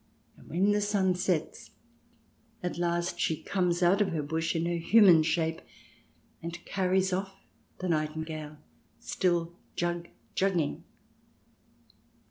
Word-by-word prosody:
And - - -17
when 190 +5 +2
the 205 0 +2
sun 200 -3 +2
sets 180 -3 -2 0.9
at 180 -1 -3
last 175 0 -1
she 160 - 0
comes 180 -2 0
out 190 +4 +4
of 195 - +1
the 155 -2 -1
bush 160 +3 -1
in 165 0 0
her 170 0 0
human 175 -1 +6
shape, 160 0 0 0.8
and 170 +1 -5
carries 190 0 +1
off 195 +1 -2 0.4
the 185 - -4
nightingale, 155 -1 -3 0.4
still 175 -2 0 0.2
jug 175 0 -2 0.3
jugging. 180 -6 0
175 Hz, 120 wpm, -29 LUFS, 165-190 Hz, 0.9 s, human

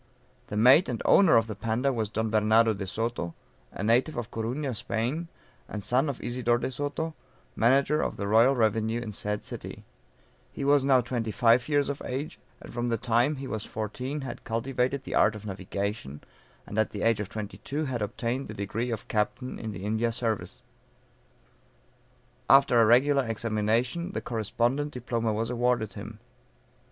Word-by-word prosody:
The 105 - -4
mate 130 - +6
and - - -2
owner 190 -10 +6
of 115 - +3
the 110 - -5
Panda 115 +6 0
was 110 -4 -2
Don 110 0 -2
Bernardo 110 +1 +4
De 100 -1 -5
Soto, 115 -5 -3 0.4
a - - -6
native 120 +7 +2
of 120 -2 -4
Corunna, 125 +5 -2
Spain, 120 +9 -2 0.4
and 105 -2 -5
son, 130 +7 +2
of 135 - -4
Isidore 120 -1 +1
De 125 - -3
Soto, 145 +5 -3 0.4
manager 135 +6 +3
of - - -2
the 100 - -3
royal 115 +6 +5
revenue 110 0 +1
in 115 -3 -5
said 105 0 -3
city; - - -7 0.7
he 140 - -5
was 140 -1 +4
now 135 -2 +5
twenty 120 -2 -3
five 120 +3 +3
years 145 -1 +2
of 140 0 -4
age, 135 +4 -4 0.2
and - - -12
from 120 0 -2
the 115 -1 0
time 120 +5 +2
he 135 0 -6
was 110 -4 -4
fourteen 125 +7 -4
had 130 -3 -7
cultivated 125 +3 -1
the - - -6
art 110 +1 +4
of 105 0 -9
navigation, 95 -5 -4 0.4
and 105 - -3
at 110 - +2
the 105 - -5
age 115 -2 +3
of 105 -2 -4
twenty 105 -1 -6
two 150 +3 -3
had 125 -4 -3
obtained 120 +5 -2
the 105 - -8
degree 105 +5 -3
of 115 -3 -4
captain 105 +4 -2
in 110 - -5
the 100 -1 -7
India 110 +2 0
service. 115 -3 -3 1.9
After 135 -3 +6
a - - +6
regular 135 +2 +4
examination 115 - -1
the - - -2
correspondent 120 +6 -1
diploma 115 -2 -1
was 115 +2 -2
awarded 120 -4 0
him. - - -8
115 Hz, 175 wpm, -28 LUFS, 110-130 Hz, 1.9 s, mate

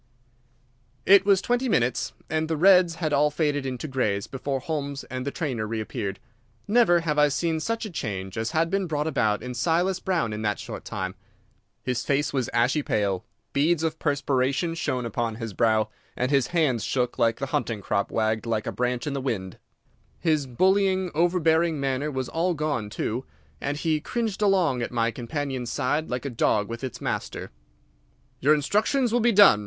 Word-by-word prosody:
It 195 0 +6
was 195 -2 +4
twenty 245 +1 +1
minutes, 125 - +1
and 160 0 -1
the 160 -1 -1
reds 180 0 +6
had 155 -3 -2
all 145 +1 +4
faded 145 -2 0
into 130 +3 -4
greys 105 -8 0
before 135 0 -3
Holmes 140 -1 -4
and 130 +1 -4
the - - -1
trainer 130 -11 -2
reappeared. 105 -3 -4 0.5
Never 200 -6 +4
have 150 -2 0
I 150 - +6
seen 160 +3 0
such 230 +7 -2
a - - -5
change 95 - -4
as 110 +1 -1
had 165 +2 +1
been 195 -1 0
brought 150 -2 -1
about 120 -9 +1
in 125 0 -5
Silas 175 +8 +1
Brown 170 - 0
in 105 - -4
that 105 -2 0
short - - -7
time. 95 0 -4 0.7
His 125 -1 -1
face 145 +1 0
was 130 -4 0
ashy 120 +6 +2
pale, 100 -7 0 0.3
beads 160 +3 +2
of 160 -1 -1
perspiration 140 +2 0
shone 130 -7 -2
upon 115 0 -2
his 115 -2 -6
brow, 110 +1 +2 0.3
and 125 +2 0
his 135 -4 +3
hands 150 - +1
shook 125 +1 -1
until 115 0 +4
the 135 -1 -4
hunting 115 -3 -1
crop 100 +1 -1
wagged 110 0 0
like 110 -2 -1
a - - -2
branch 125 0 -1
in 145 - -2
the 140 - -2
wind. 95 -9 -3 0.6
His 155 -4 +1
bullying, 190 +6 +2
overbearing 165 -1 +2
manner 135 +2 -1
was 130 -3 -3
all 170 +2 0
gone 145 -9 -2
too, 115 +4 -3 0.4
and 145 +1 -2
he 155 -1 0
cringed 225 +1 -2
along 185 -11 +3
at 120 - -2
my 115 -1 +1
companion's 130 0 -4
side 145 +3 -1
like 125 +2 -3
a 140 - -2
dog 105 -2 +1
with 115 +2 -6
its 130 -4 -5
master. - - -4 0.9
"Your 150 +3 +5
instructions 215 - +1
will 245 - +3
be 240 +1 +4
done. 200 - +7
140 Hz, 185 wpm, -25 LUFS, 120-165 Hz, 0.9 s, done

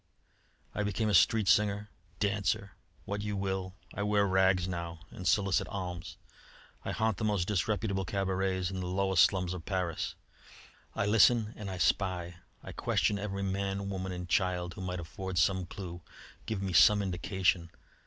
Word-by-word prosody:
I - - -2
became 105 +1 0
a - - +1
street 110 -2 +4
singer, 105 +1 +2 0.3
dancer, 100 -1 0 0.3
what 100 0 -3
you 105 -1 -3
will. 95 -1 -2 0.2
I 100 - -4
wear 105 0 +3
rags 95 -1 +3
now 85 -2 -5
and 95 -5 -5
solicit 100 -3 +2
alms. 90 -3 -5 0.7
I - - -4
haunt 110 -2 0
the - - -4
most 100 -5 +1
disreputable 100 0 0
cabarets 95 -1 -1
in 95 - -4
the 90 - -3
lowest 95 -1 +2
slums 90 -2 +3
of 90 -3 -6
Paris. 90 -3 -2 0.8
I - - 0
listen 110 +1 +4
and 105 -4 -6
I 95 - -4
spy; 90 +1 0 0.3
I - - -7
question 100 - 0
every 100 -1 -3
man, 100 +1 -2
woman, 95 -1 -3
and 90 -1 -5
child 90 0 0
who 95 - -8
might 90 -1 -3
afford 95 +2 -5
some 95 +1 +2
clue, 90 -2 -7 0.5
give 105 -3 -2
me 95 -2 -2
some 100 +5 +6
indication. 95 -2 0
95 Hz, 165 wpm, -31 LUFS, 90-100 Hz, 0.8 s, some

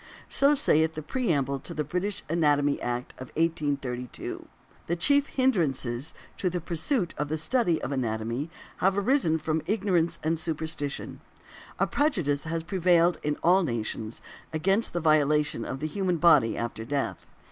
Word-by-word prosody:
So 280 +2 +4
saith 160 - +3
the 155 - -5
preamble 145 - 0
to - - -8
the 150 - 0
British 180 +7 -3
Anatomy 145 -3 +2
Act 120 +1 -3
of 130 - -7
1832. 140 -7 -2 0.4
The 170 - 0
chief 285 - +3
hindrances 150 - 0 0.2
to 185 - +1
the 180 0 -2
pursuit 175 - -1
of 150 0 -1
the 155 - -1
study 175 -1 +1
of 135 - -3
anatomy 120 +2 -2 0.3
have 190 +1 +2
arisen 200 - +3
from 155 0 -1
ignorance 190 -5 +1
and 160 +1 0
superstition. 160 -3 -4 0.6
A - - +2
prejudice 175 - 0
has 165 0 -2
prevailed 175 -1 +3
in 150 0 -1
all 180 +3 +5
nations 115 - -3 0.3
against 195 +8 +1
the 175 - -1
violation 150 -4 +3
of 130 - -5
the - - -1
human 180 +2 -1
body 155 -8 +5
after 115 -1 -4
death. 140 +4 -3
160 Hz, 150 wpm, -27 LUFS, 140-180 Hz, 0.6 s, all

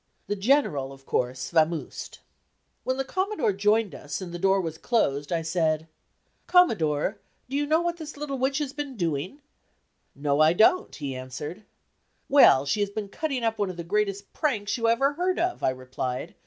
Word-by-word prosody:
The 205 - -2
General, 195 - +1
of 135 0 -14
course, 125 +1 -2
"vamosed." 160 -1 0 0.7
When 260 0 -1
the 270 - 0
Commodore 375 - 0
joined 210 +1 +2
us 145 -1 -6
and 185 -3 -7
the 175 - -6
door 195 +1 +3
was 160 -3 -4
closed, 145 - 0
I 165 -1 0
said: 160 -1 0 0.6
"Commodore, 200 - +3 0.3
do 265 - -5
you 290 +1 0
know 315 +2 +3
what 345 0 -1
this 310 -3 -8
little 280 -2 -4
witch 270 +2 +1
has 290 -3 -2
been 285 -4 -5
doing?" 170 - -2 0.7
"No, 140 0 0
I 155 +1 +6
don't," 225 - +3
he 140 -4 -5
answered. 130 +10 -7 0.6
"Well, 145 - +7
she 210 +9 0
has 205 -1 +1
been 205 0 -5
cutting 275 0 -3
up 225 -1 0
one 200 -2 0
of 180 - -7
the 170 - -4
greatest 200 +2 -1
pranks 220 -9 -1
you 230 -2 0
ever 270 +5 +3
heard 360 +4 0
of," 355 +1 -1
I - - +3
replied. 130 0 -4
200 Hz, 180 wpm, -26 LUFS, -, 0.7 s, Well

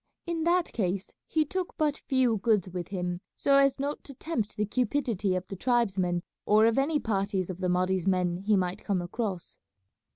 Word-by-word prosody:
In 335 -2 -2
that 350 0 +2
case 190 -2 -2
he 315 -1 +2
took 370 +4 -3
but 300 -2 +2
few 255 -4 +3
goods 205 -2 +2
with 180 -1 -5
him, 180 -2 -3
so 275 0 +3
as 275 -1 +4
not 285 +2 -3
to 275 - -9
tempt 245 -8 -3
the 210 - +1
cupidity 220 -4 0
of 185 0 -3
the 195 - -6
tribesmen 190 -6 +1 0.2
or 215 +1 +5
of 230 +3 +3
any 295 +2 +2
parties 195 -5 -1
of 180 - -9
the 185 -1 0
Mahdi's 185 0 +1
men 180 -2 +2
he 205 +3 +2
might 185 +1 -1
come 190 -4 0
across. 190 -1 -4
210 Hz, 190 wpm, -28 LUFS, 185-270 Hz, 0.2 s, or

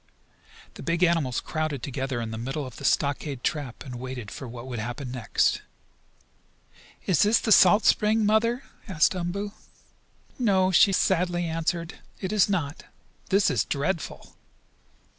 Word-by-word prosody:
The - - -11
big 170 +1 0
animals 165 -8 +2
crowded 155 -5 -3
together 135 -2 -3
in 115 -1 -4
the 110 - -5
middle 135 +5 -3
of 130 - -10
the - - -10
stockade 140 -2 0
trap, 145 -5 -3
and 125 -3 -7
waited 125 -4 -6
for 135 - -7
what 120 +1 -8
would 125 -3 -5
happen 120 +3 -5
next. 125 -3 0 1.4
"Is 180 -5 +2
this 210 +3 +4
the 220 - -2
salt 205 +2 +6
spring, 215 +1 +3
Mother?" 230 +4 +2 0.2
asked 165 -5 +2
Umboo. 185 +4 -3 0.9
"No," 190 -6 +3
she 195 +2 +6
sadly 175 -2 +1
answered. 165 +1 -3 0.2
"It 190 +1 -3
is 205 -2 +4
not. 160 -7 -2 0.4
This 200 +2 +3
is 110 -6 +1
dreadful!" 155 +7 -3
160 Hz, 145 wpm, -26 LUFS, 130-190 Hz, 1.4 s, salt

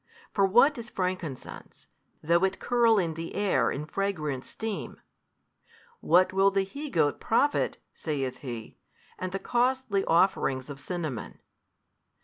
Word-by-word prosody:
For 195 -1 +3
what 245 +7 +5
is 235 0 -8
frankincense, 180 -9 -5 0.4
though 170 +3 +3
it 190 0 +1
curl 235 -2 +3
in 170 -4 +1
the 165 +1 -6
air 190 - +2
in 145 +2 -3
fragrant 155 -7 -2
steam, 220 -2 -5 1.0
what 185 +2 +4
will 195 +1 +5
the 195 0 +1
he 280 +10 -7
goat 145 - +1
profit 285 +6 +1 0.2
(saith 135 -5 -3
He) 120 -5 -7 0.4
and 185 0 -3
the 195 - -2
costly 245 -3 +1
offerings 150 -6 +2
of 140 - -8
cinnamon? 155 -8 -5
185 Hz, 130 wpm, -28 LUFS, 150-205 Hz, 1.0 s, what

